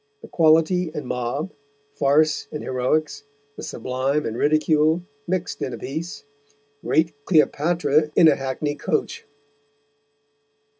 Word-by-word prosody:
The - - -9
Quality 165 +2 +3
and 150 - -4
Mob, 125 +8 -3 0.4
Farce 145 +2 +2
and 150 - -5
Heroicks, 130 +5 -1 0.3
the - - -9
Sublime 130 +4 -2
and 110 - -3
Ridicule 155 +4 +2 0.2
mixt 185 0 -3
in 130 - -3
a - - -5
Piece, 160 +6 -6 0.6
great 160 +1 +1
Cleopatra 155 -2 +2
in 165 - +7
a 150 - +5
Hackney 135 +2 -3
Coach." - - -3
150 Hz, 115 wpm, -23 LUFS, 140-160 Hz, 0.6 s, in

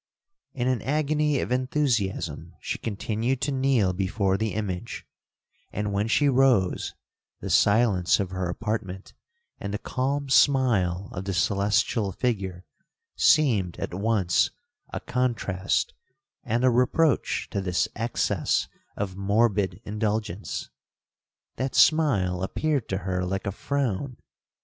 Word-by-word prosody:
'In 125 -2 -1
an 130 -3 +1
agony 150 +1 +1
of - - -4
enthusiasm 130 -6 -1
she - - -4
continued 115 +4 -2
to 145 - 0
kneel 130 -8 +2
before 95 +1 0
the 110 -1 -2
image; 105 0 -4 0.7
and 105 0 -2
when 100 +2 0
she 145 +5 +3
rose, 130 -8 +2 0.4
the - - -5
silence 100 -4 +4
of 95 -2 -2
her 95 -1 -2
apartment, 95 -1 -4 0.5
and 100 - -4
the 105 - -1
calm 140 +5 -2
smile 110 -10 +3
of 95 0 -5
the 95 -1 -2
celestial 100 +3 +1
figure, 95 -6 -2 0.5
seemed 110 - +3
at - - -4
once 100 -2 +2 0.4
a - - -3
contrast 110 -7 -1 0.5
and 120 +3 -1
a 130 - +5
reproach 125 +4 +2
to 100 - -1
this 90 -1 0
excess 115 +2 0 0.3
of 100 -2 -3
morbid 100 0 +1
indulgence. 105 -2 -3 0.9
That 130 0 -2
smile 105 - +3
appeared 140 +6 -1
to 95 - -1
her 90 -1 -1
like 95 +2 -3
a 100 - -1
frown. 130 +1 -2
105 Hz, 125 wpm, -26 LUFS, 95-130 Hz, 0.9 s, a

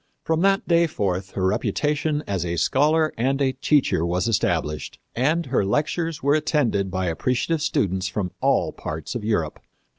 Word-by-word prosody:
From 160 0 0
that 195 +1 +2
day 170 -1 +4
forth 95 - -2
her 95 - -1
reputation 150 +9 0
as 95 -4 -2
a 85 0 -2
scholar 155 - +2
and 135 +3 +1
a 135 -2 +2
teacher 135 - +1
was 90 +5 0
established, 75 -8 -1 0.2
and 155 +7 +1
her 125 -5 +1
lectures 155 - -1
were 140 +1 +3
attended 130 -10 +1
by 95 0 -2
appreciative 125 - 0
students 95 - 0
from 95 -2 -3
all - - +2
parts 80 +1 -6
of 120 -4 -4
Europe. 95 -8 -1
125 Hz, 160 wpm, -23 LUFS, 95-150 Hz, 0.2 s, day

